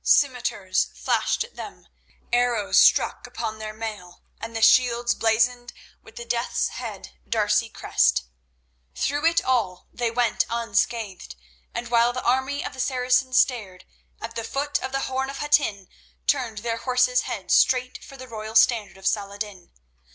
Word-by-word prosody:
Scimitars 245 -9 +2
flashed - - 0
at 475 - -15
them, - - -10 0.5
arrows 240 -4 +3
struck - - +4
upon 220 0 -5
their 215 0 -5
mail 215 -5 -8 0.2
and 225 +1 -7
the 225 - -2
shields 240 -1 +4
blazoned 240 +2 +1 0.3
with 225 - -17
the 235 - -7
Death's 235 +1 -1
head - - -8 0.2
D'Arcy 220 0 +1
crest. - - +1 0.7
Through 290 +3 0
it 335 0 +2
all 220 -9 -1
they 240 -1 -1
went 235 -1 +1
unscathed, 225 - -2 0.4
and 235 0 -5
while 235 0 +4
the 255 - -4
army 265 +3 0
of - - -5
the 260 - -11
Saracens 255 0 +1
stared, 200 -8 -1 0.3
at 230 0 -7
the 230 - -3
foot 285 +5 -2
of 260 +1 -4
the 270 0 -1
Horn 265 0 -2
of 275 - -6
Hattin 290 -10 +1 0.4
turned 230 -6 0
their 230 -1 -1
horses' 250 0 +2
heads - - -2
straight 255 -1 +2
for 275 - -12
the 255 0 -10
royal 220 -1 -7
standard 220 -3 +3
of 190 - -14
Saladin. 200 -3 -3
235 Hz, 155 wpm, -24 LUFS, 215-255 Hz, 0.7 s, struck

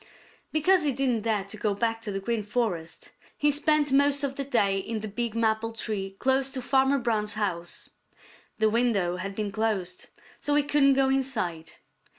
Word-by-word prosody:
Because 345 +3 +3
he 290 - +2
didn't 250 -4 0
dare 215 -2 0
to 200 +2 -9
go 210 -1 -1
back 225 +1 -1
to 215 - -5
the 195 - -2
Green 225 +3 -1
Forest, 205 -7 -3 0.3
he 295 0 +3
spent 295 -1 +2
most 285 +1 +4
of 270 -1 -2
the 275 - -3
day 200 -8 +1
in 220 +2 -4
the 215 - -4
big 230 +2 -3
maple 225 0 +1
tree 200 -4 -4
close 265 +2 +2
to 265 -1 -4
Farmer 270 +2 +3
Brown's 215 -4 -1
house. 175 -5 -3 0.7
The 220 -1 +2
window 210 -7 +1
had 195 +2 -5
been 210 -1 -3
closed, 195 -4 -2 0.3
so 290 - 0
he 295 - +4
couldn't 285 -1 +4
go 270 0 +3
inside. 220 -12 -2
225 Hz, 180 wpm, -27 LUFS, 205-270 Hz, 0.7 s, most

